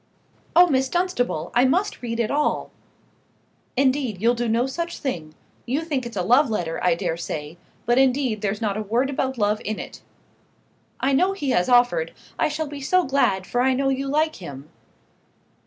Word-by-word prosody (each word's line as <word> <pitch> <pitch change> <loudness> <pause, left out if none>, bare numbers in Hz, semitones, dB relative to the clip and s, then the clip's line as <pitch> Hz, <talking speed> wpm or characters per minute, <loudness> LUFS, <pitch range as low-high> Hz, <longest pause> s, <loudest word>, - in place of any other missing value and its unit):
"Oh, 350 +1 +9
Miss 265 -5 +1
Dunstable! 260 - -1
I 245 - +4
must 365 +11 +1
read 235 -1 -4
it 230 - 0
all." 295 +1 0 1.1
"Indeed 260 -6 +1
you'll 230 +4 +3
do 240 0 -2
no 230 +2 +2
such 335 +6 -4
thing. 160 - -4 0.3
You 270 +6 0
think 270 -6 -2
it's 230 -3 -8
a 180 - 0
love 250 +8 +4
letter, 175 -7 -2
I 180 -2 +3
dare 165 0 -2
say; 155 0 -6 0.3
but 240 +2 +3
indeed 255 -5 +2
there's 205 0 -2
not 205 -2 0
a - - -2
word 235 +6 0
about 265 -1 -2
love 210 -1 +1
in 215 0 -3
it." - - -8 1.0
"I 270 +1 +2
know 365 +8 +3
he 290 -9 -2
has 180 0 +2
offered. 245 - +3 0.3
I - - +3
shall 310 +1 -2
be 290 -1 -8
so 365 +7 +2
glad, 230 - +1
for 245 - 0
I 260 +1 +3
know 270 +1 +1
you 270 +1 -1
like 310 +3 +1
him." 145 -4 -10
250 Hz, 190 wpm, -23 LUFS, 210-280 Hz, 1.1 s, Oh